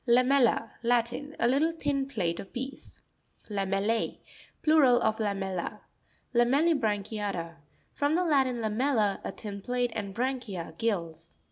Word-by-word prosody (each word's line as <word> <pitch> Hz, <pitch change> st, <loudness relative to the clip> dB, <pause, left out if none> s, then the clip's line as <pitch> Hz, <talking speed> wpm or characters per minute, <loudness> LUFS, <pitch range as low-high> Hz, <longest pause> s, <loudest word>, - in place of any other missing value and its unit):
Lame'LLa.—Latin. 245 Hz, +1 st, +2 dB
A 235 Hz, -, +3 dB
little 285 Hz, +6 st, +3 dB
thin 285 Hz, -4 st, -1 dB
plate 170 Hz, -11 st, -1 dB
surface 195 Hz, -, -8 dB
or -, -, -32 dB
piece. 265 Hz, +2 st, -7 dB, 0.5 s
Lame'LL#.—Plural 225 Hz, +7 st, +1 dB
of 220 Hz, -2 st, +1 dB
lamella. 195 Hz, -4 st, -2 dB, 0.5 s
LAME' 280 Hz, +7 st, +3 dB
LLIBRA'NCHIATA 205 Hz, -5 st, -2 dB, 0.2 s
— -, -, -38 dB
From 290 Hz, +2 st, +1 dB
the 360 Hz, -, +2 dB
Latin, 270 Hz, -6 st, +2 dB
lamella, 220 Hz, -1 st, +1 dB
a -, -, -3 dB
thin 200 Hz, -2 st, -7 dB
plate, 245 Hz, +2 st, -1 dB
and 200 Hz, -3 st, -4 dB
branchia, 230 Hz, -10 st, -3 dB
gills. 170 Hz, -7 st, -2 dB
235 Hz, 125 wpm, -29 LUFS, 200-270 Hz, 0.5 s, A